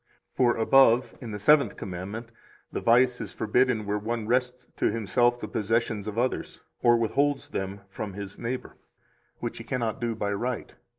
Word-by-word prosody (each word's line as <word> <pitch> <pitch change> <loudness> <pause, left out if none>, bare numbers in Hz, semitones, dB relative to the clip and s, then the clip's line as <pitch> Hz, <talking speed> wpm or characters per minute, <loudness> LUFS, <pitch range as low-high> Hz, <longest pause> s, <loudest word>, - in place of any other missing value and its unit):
For 120 -2 +3
above, 125 +1 +4
in 120 - -6
the 105 - -4
Seventh 140 +2 +4
Commandment, 100 +6 -6 0.4
the - - -3
vice 125 +1 +4
is - - -6
forbidden 115 0 +1
where 105 +1 -1
one 115 +1 -3
wrests 125 +2 0
to - - +2
himself 120 +3 +1
the 110 - -5
possessions 110 -1 -1
of 105 +1 -5
others, 125 +2 -2 0.2
or 120 -1 +5
withholds 140 +5 0
them 95 +1 -4
from 100 +1 -6
his 100 0 -7
neighbor, 125 +2 -5 0.6
which - - -4
he - - -7
cannot 120 0 -2
do 115 -1 -1
by 100 -2 -1
right. 120 +4 -3
115 Hz, 170 wpm, -27 LUFS, 105-125 Hz, 0.6 s, or